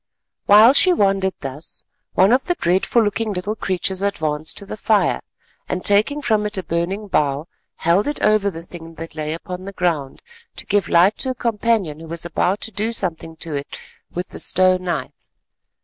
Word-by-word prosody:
While 215 +5 +8
she 365 +5 +6
wondered 195 - +1
thus, 140 +3 -7 0.3
one 190 +3 +5
of 260 - +2
the 355 - 0
dreadful 190 - +2
looking 215 +1 -1
little 195 +4 -3
creatures 190 -2 -2
advanced 160 -6 -2
to 200 - -7
the - - -6
fire, 215 -1 +1 0.5
and 180 - -3
taking 215 +9 +2
from 215 -4 +1
it 210 - -5
a 190 - -2
burning 180 +6 -2
bough, 145 -3 0 0.3
held 175 - +2
it 290 - -2
over 210 -1 +3
the 165 -3 -8
thing 165 -1 -11
that 165 0 -8
lay 155 0 -3
upon 180 +3 -6
the 200 - -7
ground, 160 -8 -2 0.3
to - - -6
give 205 -1 +1
light 180 +5 +4
to 260 - -2
a 255 - -2
companion 220 -9 0
who 165 - -10
was 170 +1 -3
about 185 +3 0
to 225 - -2
do 215 +3 -1
something 165 -7 -4
to 160 - -5
it 140 0 -5 0.3
with 180 +1 -5
the - - -9
stone 185 0 +3
knife. 165 -7 -4
190 Hz, 190 wpm, -20 LUFS, 165-210 Hz, 0.5 s, While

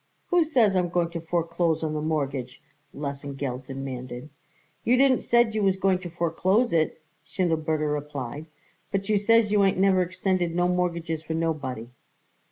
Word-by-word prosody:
"Who 355 -2 +4
says 240 -11 +3
I'm 180 -1 +1
going 170 -1 0
to 170 -1 -5
foreclose 170 -1 0
the 160 - -1
mortgage?" 145 -5 -2 0.3
Lesengeld 140 -2 -5
demanded. 130 0 -6 0.5
"You 250 +2 +3
didn't 265 -1 +4
said 235 -2 +3
you 215 - 0
was 195 -1 +2
going 190 -1 +2
to 180 -1 -7
foreclose 175 +7 +1
it," 160 -1 0 0.2
Schindelberger 160 -3 0
replied, 145 0 -5 0.4
"but 195 0 -2
you 210 -1 +3
says 225 0 +3
you 205 -1 +4
ain't 195 -2 +2
never 190 -1 +4
extended 180 -1 -1
no 175 0 +2
mortgages 170 -3 -1
for 160 0 -4
nobody." 145 -8 -2
170 Hz, 155 wpm, -26 LUFS, 150-190 Hz, 0.5 s, Who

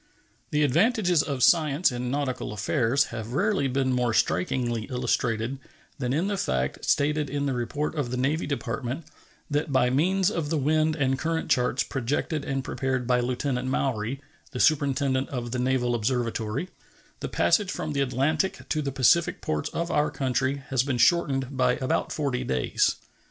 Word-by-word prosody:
The 150 0 +2
advantages 180 - +3
of 140 -5 -2
science 155 -1 +4
in 125 0 -3
nautical 135 -5 -2
affairs 120 +5 +1
have 115 0 -5
rarely 190 -3 +1
been 130 0 0
more 120 -2 +1
strikingly 120 +4 0
illustrated 125 -1 -1 0.4
than 125 -2 -1
in 155 +7 +1
the 200 0 -1
fact, 65 - -1
stated 150 0 +1
in 145 +1 -2
the 135 - 0
report 135 +5 -2
of 145 -6 -2
the 125 - -3
Navy 145 +6 0
Department, 140 +1 -3 0.5
that 145 0 0
by 125 -2 +3
means 185 +8 +2
of 165 -7 -2
the 160 - 0
wind 155 +2 +2
and 135 -3 0
current 165 +1 -2
charts 125 +1 +2
projected 140 +4 -2
and 135 -1 -2
prepared 130 -1 -2
by 125 0 +2
Lieutenant 125 +1 -1
Maury, 130 -1 -1 0.3
the 125 - -6
Superintendent 140 -3 +2
of 120 -3 -4
the 125 - -2
Naval 125 -1 +1
Observatory, 120 +4 -1 0.5
the - - -4
passage 205 -4 +2
from 155 - -3
the 140 - 0
Atlantic 140 +7 0
to 155 - 0
the 140 -2 -2
Pacific 135 +6 +3
ports 75 -1 -2
of 170 +1 -3
our 150 0 +2
country 135 +1 -1
has 135 -3 +2
been 130 -1 -1
shortened 135 -3 +2
by 125 -1 +3
about 130 0 -1
forty 135 -4 -1
days. 65 - +1
135 Hz, 165 wpm, -26 LUFS, 125-150 Hz, 0.5 s, science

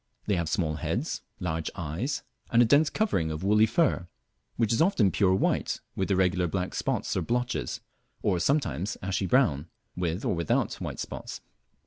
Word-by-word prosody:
They 105 - +1
have 85 -3 -1
small 80 -6 0
heads, - - -2 0.2
large 80 0 -2
eyes, 90 - -3 0.3
and 115 - +3
a 120 - +7
dense 145 +6 +5
covering 145 - 0
of 80 +2 -4
woolly 105 +3 +5
fur, 135 - +1 0.5
which 115 -1 +2
is 115 - +2
often 160 - +4
pure 95 -1 +3
white - - 0 0.2
with 95 - -1
irregular 90 -2 +2
black 90 +2 -2
spots - - -1
or - - +1
blotches, 125 +1 -2 0.4
or 95 -4 +2
sometimes 110 - 0
ashy 95 0 -1
brown 85 - +2 0.3
with 90 +5 -2
or 115 - +1
without 85 -2 0
white - - -4
spots. - - -6
95 Hz, 165 wpm, -28 LUFS, 85-120 Hz, 0.5 s, a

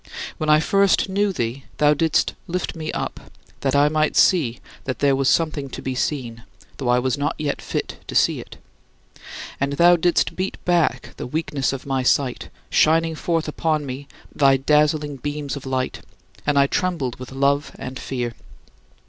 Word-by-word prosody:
When 155 - -1
I 150 0 +6
first 195 +4 +3
knew 200 +1 +1
thee, 120 -4 -3
thou 150 0 +5
didst 160 +1 +1
lift 180 +1 -3
me 155 -1 -4
up, - - -4 0.4
that 135 0 0
I 145 +1 +5
might 155 0 +1
see 145 -11 +3 0.3
that 130 - -2
there 140 -1 +3
was 135 0 +2
something 155 -4 +1
to - - -7
be 130 - -2
seen, 125 -3 -2 0.4
though 130 -3 -2
I 125 - +4
was 130 +3 0
not 145 - 0
yet 150 -2 -2
fit - - -4
to - - -6
see - - +3
it. - - -11 1.0
And 140 +1 0
thou 175 +4 +6
didst 175 +1 +1
beat 185 +1 -3
back 175 -3 +1
the - - -5
weakness 150 -1 -1
of 135 -1 -6
my 135 -1 0
sight, 125 0 +1 0.2
shining 165 +1 +3
forth 165 +1 -1
upon 155 -1 -1
me 135 +1 -6 0.3
thy 135 -2 +4
dazzling 150 +1 +2
beams 145 +1 -4
of 140 -1 -8
light, 130 -1 -2 0.5
and 145 -1 +2
I 140 - +6
trembled 140 -6 -1
with 130 0 -8
love 140 +1 +1
and 130 +1 -6
fear. 120 -3 -3
145 Hz, 175 wpm, -22 LUFS, 135-160 Hz, 1.0 s, I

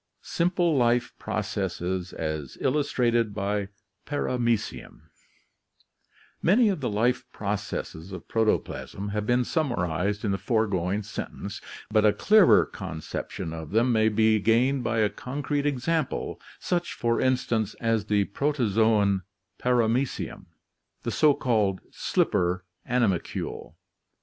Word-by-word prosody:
Simple 175 -1 +1
Life 120 -1 +2
Processes 90 0 -2
as 75 -4 -4
Illustrated 120 -6 +1
by 100 0 -1 0.4
Paramecium 120 - -1 1.4
Many 215 +6 +4
of 190 - -1
the 125 - 0
life 120 +4 +1
processes 100 -5 -4
of 95 - -8
protoplasm 110 -2 -1
have 105 +1 -2
been 125 0 +3
summarized 100 - -1
in 100 - +1
the 95 - -1
foregoing 100 -2 0
sentence, 105 - -6 0.3
but 110 -1 +4
a 105 -1 +5
clearer 210 -4 +6
conception 85 0 -6
of 80 -2 -7
them 115 +4 +2
may 110 -1 +4
be 110 0 +3
gained 120 +6 +2
by 115 -1 0
a 105 - +4
concrete 145 +2 -2
example, 145 +2 -1 0.2
such, 175 -1 -1
for 115 -1 0
instance, 120 -4 0
as 115 -2 0
the 105 -1 +2
protozoon 110 -5 +2 0.4
Paramecium, 125 +1 0 0.6
the - - -2
so 150 -2 +4
called 105 -6 +1
slipper 90 +1 0 0.2
animalcule. 115 -8 -1
110 Hz, 115 wpm, -26 LUFS, 100-125 Hz, 1.4 s, clearer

